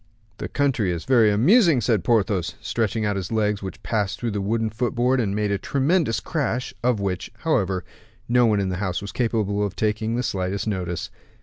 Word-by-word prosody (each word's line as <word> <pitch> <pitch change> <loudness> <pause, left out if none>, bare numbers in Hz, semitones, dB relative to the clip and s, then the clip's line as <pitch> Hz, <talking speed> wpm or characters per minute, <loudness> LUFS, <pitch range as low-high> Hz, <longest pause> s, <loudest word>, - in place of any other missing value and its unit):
"The - - -4
country 135 -9 +1
is 85 -2 -3
very 120 -5 +5
amusing," 160 - +5
said 110 -5 +1
Porthos, 100 -4 +1
stretching 110 -1 -1
out 105 -1 0
his 95 0 -4
legs, 105 -2 0
which 95 -1 -7
passed 105 0 -1
through 120 -2 -2
the 105 -1 -2
wooden 110 +2 0
footboard, 125 +3 +1
and 100 -4 0
made 105 -1 0
a 100 - 0
tremendous 140 - +1
crash, 130 -2 -2
of 125 -3 +2
which, 95 -3 -3
however, 95 - 0 0.4
no 120 0 +4
one 105 -2 +2
in 95 -1 0
the 90 - -2
house 95 -3 -1
was 100 - -7
capable 105 -4 0
of 100 -2 -3
taking 110 +1 -1
the 125 - -1
slightest 95 -3 -2
notice. 90 -5 -3
110 Hz, 195 wpm, -23 LUFS, 100-120 Hz, 0.4 s, very